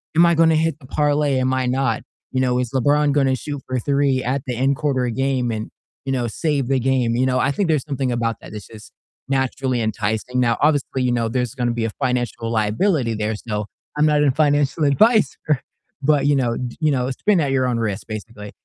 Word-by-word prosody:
"Am 170 - +6
I 170 - +4
gonna 160 0 +4
hit 160 -1 0
the 130 - -15
parlay? 145 -2 +1
Am 130 0 +1
I 130 -1 0
not?" 130 -3 0 0.3
You 130 - 0
know, 125 -1 +1
"Is 125 -3 -2
LeBron 145 +3 +2
gonna 135 -2 +2
shoot 145 +2 -6
for 130 - -2
3 140 0 +1
at 130 +3 -1
the 125 - -2
end 135 +3 +1
quarter 135 -4 0
of 120 -2 -3
game 135 -2 0
and, 110 -1 -4 0.4
you 135 - -2
know, 125 -2 0
save 140 +2 -1
the 135 0 +2
game," 125 -2 +1
you 130 +2 +2
know? 130 0 +1
I 135 - +2
think 185 +4 -1
there's 155 -4 +2
something 135 -3 -1
about 115 -2 -1
that - - -11
that's 105 -2 -8
just 110 -2 -13 0.4
naturally 130 -2 0
enticing. 110 +3 -2
Now, 120 -2 +2
obviously, 145 -3 +1
you 125 - +1
know, 115 -2 0
there's 125 +1 -2
gonna 120 -3 0
be 115 -1 -1
a 115 - -2
financial 120 -1 -2
liability 115 - +1
there, 110 +1 -2
so 105 -1 -4 0.3
I'm 150 +1 +4
not 150 -1 +3
a 140 - +4
financial 145 +1 +1
advisor 150 - +2 0.4
but, 145 0 +2
you 145 - +4
know 120 -4 0 0.2
you 155 -1 +2
know, 130 -1 0
spin 195 +7 +1
at 140 -3 0
your 130 -1 +1
own 125 -2 0
risk, 105 -4 -3
basically. 110 -1 -8
130 Hz, 220 wpm, -21 LUFS, 120-145 Hz, 0.4 s, Am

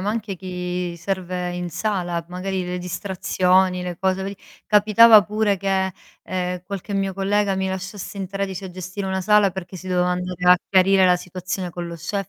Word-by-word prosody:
ma 200 - -2
anche 215 -3 -3
chi 180 -1 -4
serve 180 0 -3
in 175 -1 -4
sala. 175 -2 -2
Magari 185 0 -3
le 180 0 -3
distrazioni, 185 0 +1
le 175 -1 -4
cose 190 +1 0
veri 200 +1 -5 0.3
capitava 215 +1 +7
pure 210 0 0
che, 190 -1 0 0.3
ehm, 180 -1 -3
qualche 200 +1 -5
mio 195 -1 -1
collega 200 +1 +1
mi 190 0 -1
lasciasse 190 +1 -6
in 195 - -3
13 195 0 -4
a 185 - -6
gestire 185 +2 -5
una 190 0 -1
sala, 205 -1 +4
perché 185 0 -7
si 185 - -10
doveva 180 -1 +1
andare 180 0 -3
a 180 - +9
chiarire 190 0 +5
la 180 - +5
situazione 180 +1 -5
con 175 +1 -6
lo 170 - -6
chef 195 +3 -4
185 Hz, 185 wpm, -22 LUFS, 180-195 Hz, 0.3 s, a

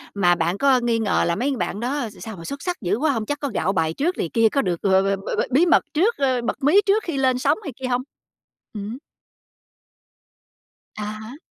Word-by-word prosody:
mà 175 -3 +4
bạn 170 +4 -1
có 270 0 +4
nghi 235 -1 0
ngờ 220 - +1
là 170 - +1
mấy 270 +2 -1
bạn 205 - -3
đó 250 -1 -2
s - - -16
sao 220 -3 -7
mà 165 - -9
xuất 280 0 -6
sắc 360 -1 -3
dữ 190 +2 0
quá 300 +2 +2
hông? 225 -4 -2
Chắc 290 +3 -3
có 285 - -2
gạo 195 - 0
bài 160 -2 0
trước 340 - -1
này 165 - -2
kia, 225 -1 +4
có 275 - +1
được 175 -6 -2
b - - 0
b 190 +1 +4 0.2
b - - -5
b - - +4
bí 305 +8 +4
mật 345 - +4
trước, 410 +9 +2
ơ, 260 -3 +1
bật 235 - -4
mí 360 +9 +5
trước 415 +2 +2
khi 325 -6 -3
lên 260 -2 +2
sóng 290 +3 +2
này 285 -7 -6
kia 260 -1 -4
hông? 250 0 0 0.7
Ừm. 210 +3 -5 2.0
À 210 - -5
há. 215 +5 -7
245 Hz, 240 wpm, -22 LUFS, 205-285 Hz, 2.0 s, mí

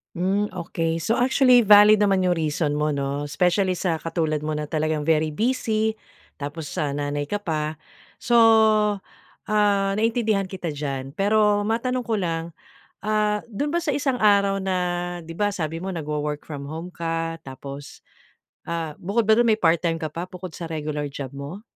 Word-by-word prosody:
Hmm, 195 +4 +1
okey 165 -1 -2
so 230 - +1
actually 250 -3 +5
valid 210 0 +8
naman 195 -2 +3
'yong 180 -2 +2
reason 150 -1 0
mo 150 -1 0
'no, 140 +1 -2
especially, 180 +4 +1
sa 170 -3 -1
katulad 160 -2 -1
mo 150 0 -3
na 150 - -2
talagang 155 0 -1
very 155 -1 +1
busy, 220 -2 0 0.4
tapos, 145 +2 -6
ah, 145 -2 -1
nanay 145 0 -2
ka 205 0 -3
pa. 155 -2 -2 0.5
So, 240 0 +3 1.1
ah, 200 -2 +2
naintindihan 220 -3 +1
kita 180 -4 -5
diyan. 135 -2 -4
Pero 205 0 +3
matanong 250 +2 -1
ko 225 - +1
lang 165 -3 -3 0.4
ah, 210 0 +1
do'n 285 +7 -3
ba 345 - +1
sa 300 -5 -1
isang 270 -4 0
araw 200 -2 +3
na, 190 -1 -1 0.5
'di 165 - -9
ba 205 +3 -1
sabi 165 -1 -3
mo 190 - -6
nagwo-work 150 -4 -3
from 140 -2 -7
home 165 +4 -6
ka 165 -1 -3
tapos, 140 +1 -10 0.6
ah, 165 -3 -4
bukod 210 +4 -1
ba 220 - +6
do'n 240 - +4
may 220 -1 +2
part-time 165 0 +2
ka 155 - -2
pa 170 +4 -5
bukod 185 -2 -9
sa 170 - -5
regular 150 -2 -3
job 140 -2 -6
mo? 150 +9 -7
175 Hz, 170 wpm, -24 LUFS, 155-210 Hz, 1.1 s, valid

